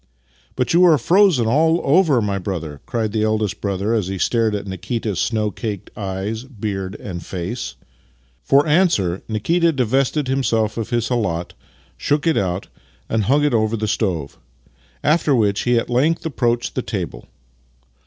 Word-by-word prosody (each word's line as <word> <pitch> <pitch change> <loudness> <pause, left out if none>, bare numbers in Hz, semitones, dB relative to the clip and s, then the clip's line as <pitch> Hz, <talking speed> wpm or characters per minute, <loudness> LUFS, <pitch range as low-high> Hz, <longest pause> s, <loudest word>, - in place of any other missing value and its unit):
" - - -35
But 125 +3 0
you 175 +2 +6
are 165 -4 +6
frozen 170 - +4
all 160 +8 +3
over, 145 - +4
my 100 -1 -1
brother! 80 -7 -5
" - - -37
cried 110 -3 -1
the 110 0 -1
eldest 110 -1 -1
brother 100 +2 -1
as 105 -6 0
he 95 0 -3
stared 110 +2 +1
at 100 - -4
Nikita's 100 +1 -3
snow 110 -2 0
caked 105 -3 -6
eyes, 100 +3 -4
beard 100 -6 -5
and 90 -6 -7
face. 95 +9 -5 0.7
For 140 +1 +4
answer, 150 - +2
Nikita 165 +11 +1
divested 135 +2 0
himself 115 -5 0
of 115 -2 -4
his 120 -2 0
khalat, 95 -9 -1 0.4
shook 145 +2 0
it 165 - +3
out, 95 0 -1 0.4
and 110 -2 0
hung 145 +6 +3
it 150 - +2
over 110 0 +1
the 110 0 -2
stove; 90 -10 -2 0.6
after 150 -1 +3
which 105 -4 +2
he 120 -1 +3
at 115 - 0
length 150 +8 +1
approached 120 -6 0
the - - -1
table. - - -5
110 Hz, 165 wpm, -20 LUFS, 100-135 Hz, 0.7 s, you